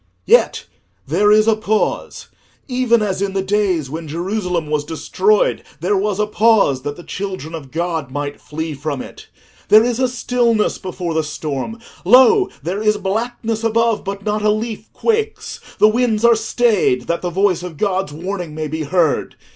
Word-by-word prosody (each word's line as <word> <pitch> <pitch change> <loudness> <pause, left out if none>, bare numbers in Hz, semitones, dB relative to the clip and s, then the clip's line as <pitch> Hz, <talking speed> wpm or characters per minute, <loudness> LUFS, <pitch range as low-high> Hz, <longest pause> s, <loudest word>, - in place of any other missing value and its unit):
"Yet 480 - +3 0.4
there 210 0 +3
is 215 +1 +5
a 225 - +4
pause—even 230 +2 -2
as 195 -2 -2
in 200 -1 -1
the 195 -1 -1
days 190 -6 0
when 160 +4 -6
Jerusalem 180 +1 -2
was 150 -1 -1
destroyed 190 +6 +1 0.2
there 185 +6 0
was 200 +1 -1
a 210 - +2
pause 210 - +3
that 145 +1 -4
the 175 - -11
children 185 -5 -5
of 150 -5 -7
God 165 -2 -2
might 145 +1 -5
flee 160 +1 -5
from 140 -1 -4
it. - - -13 0.4
There 215 +1 +7
is 240 0 -1
a 260 - +3
stillness 240 -3 0
before 180 -3 -4
the 160 - +1
storm: 150 - -4 0.3
lo, 260 - +6
there 185 +6 -3
is 215 -1 +2
blackness 220 +2 -2
above, 230 -1 +1
but 200 0 -5
not 210 0 0
a 210 - +2
leaf 220 0 -3
quakes: 440 -1 -2 0.2
the 215 - +6
winds 225 0 +1
are 235 - +7
stayed, 220 - +1
that 170 +6 -2
the 180 - -2
voice 185 0 +1
of 175 -4 -8
God's 190 -3 -1
warning 175 0 -5
may 155 0 -3
be 155 +2 -4
heard. 160 +1 0
195 Hz, 170 wpm, -18 LUFS, 165-220 Hz, 0.4 s, There